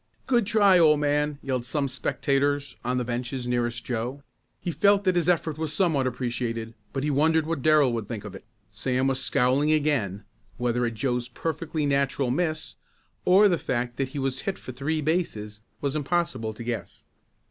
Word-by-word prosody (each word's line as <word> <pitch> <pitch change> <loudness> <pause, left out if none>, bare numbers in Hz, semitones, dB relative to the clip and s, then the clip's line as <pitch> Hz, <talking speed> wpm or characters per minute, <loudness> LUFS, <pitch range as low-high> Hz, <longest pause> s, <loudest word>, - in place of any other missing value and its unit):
"Good 240 -6 +2
try 200 -4 +5
old 155 -3 +5
man!" 150 0 +1
yelled 130 -3 -1
some 140 +3 -1
spectators 140 +1 0
on 125 +1 0
the 125 - -1
benches 125 +1 -3
nearest 120 0 -1
Joe. 125 +4 -3 0.4
He 175 - -3
felt 200 +3 +3
that 185 -2 +2
his 175 0 +2
effort 160 -3 +1
was 160 -2 -1
somewhat 160 -9 +2
appreciated 120 -2 -3 0.2
but 135 - -3
he 150 - +1
wondered 160 +3 +3
what 160 -3 -2
Darrell 150 -4 +4
would 115 -3 -3
think 110 -3 -6
of 105 - -7
it. - - -10 0.3
Sam 125 +5 0
was 135 0 +1
scowling 135 +5 +2
again, 140 -11 +1 0.3
whether 120 0 0
at 115 - -5
Joe's 125 +1 -1
perfectly 155 +3 -3
natural 140 -2 +1
miss, 155 +1 -2 0.5
or 195 +3 +7
the 175 -5 +1
fact 120 0 -2
that 135 - 0
he 145 - -8
was 135 -1 -1
hit 195 - -3
for - - -8
three 145 +5 -2
bases 110 -10 -2 0.2
was 140 0 -1
impossible 145 -8 -1
to 120 - -7
guess. 120 0 -5
140 Hz, 180 wpm, -26 LUFS, 125-155 Hz, 0.5 s, or